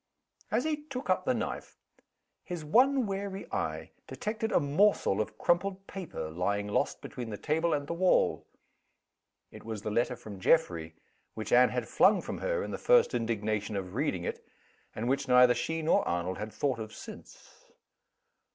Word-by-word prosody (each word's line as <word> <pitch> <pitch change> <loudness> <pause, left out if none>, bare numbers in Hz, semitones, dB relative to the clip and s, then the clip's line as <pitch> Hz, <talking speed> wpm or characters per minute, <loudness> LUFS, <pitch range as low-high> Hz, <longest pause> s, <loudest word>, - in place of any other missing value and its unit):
As 230 +4 +1
he 300 -1 -2
took 255 -8 -3
up 185 0 +1
the 255 - +2
knife, 230 - -4 0.7
his 175 -4 -6
one 255 - +4
wary 195 -1 -4
eye - - -3 0.2
detected 220 +1 -3
a - - +4
morsel 145 - +2
of 110 0 -5
crumpled 190 +2 0
paper, 160 - -6
lying 100 +5 -1
lost 105 - -1
between 120 -2 -6
the 105 - -5
table 160 +6 0
and 145 -1 0
the 170 - -3
wall. 180 +2 +2 1.0
It - - -12
was 110 -2 -6
the 105 - -2
letter 120 +3 +1
from 105 -4 -10
Geoffrey, 85 - +2 0.4
which 110 - -5
Anne 125 +1 +7
had 125 -2 -3
flung 200 0 +4
from - - -5
her, - - -1
in - - -5
the - - -4
first - - +4
indignation 110 -2 -1
of 95 -2 -4
reading 115 - -1
it - - -4 0.5
and 115 +2 -3
which 140 +2 0
neither 125 -1 +7
she 160 +5 -2
nor 155 - +4
Arnold 85 +2 -2
had 110 +1 -5
thought 135 -3 -1
of 110 -1 -6
since. - - -13
140 Hz, 170 wpm, -30 LUFS, -, 1.0 s, Anne